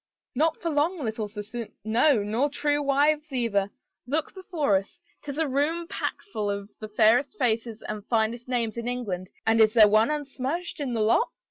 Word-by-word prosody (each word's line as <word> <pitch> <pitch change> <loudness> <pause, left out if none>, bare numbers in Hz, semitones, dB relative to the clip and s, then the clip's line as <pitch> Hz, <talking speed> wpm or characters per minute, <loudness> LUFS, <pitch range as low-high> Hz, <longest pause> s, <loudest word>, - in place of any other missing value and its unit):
" - - -67
Not 315 +5 +1
for 335 - -2
long, 305 +2 0
little 220 -2 -2
sister, 210 +2 -6 0.2
no, 225 +2 +3
nor 230 +8 0
true 290 +1 0
wives 295 +2 +2
either.... 220 -6 0 0.4
Look 300 +5 -1
before 345 - 0
us. 200 - -7 0.2
*Tis 285 -1 -6
a 320 -1 +1
room 305 +5 0
packful 215 - -3
of 200 +1 -5
the 215 - -7
fairest 225 +5 +3
faces 225 -3 -1
and 210 -1 -5
finest 230 +1 0
names 235 -3 -1
in 235 0 -4
England 200 -7 -3 0.2
and 225 0 +4
is 215 0 +5
there 215 -2 +8
one 215 +4 +4
unsmirched 295 +3 -3
in 265 -5 -2
the 225 - 0
lot? 225 - +3
245 Hz, 180 wpm, -26 LUFS, 220-295 Hz, 0.4 s, there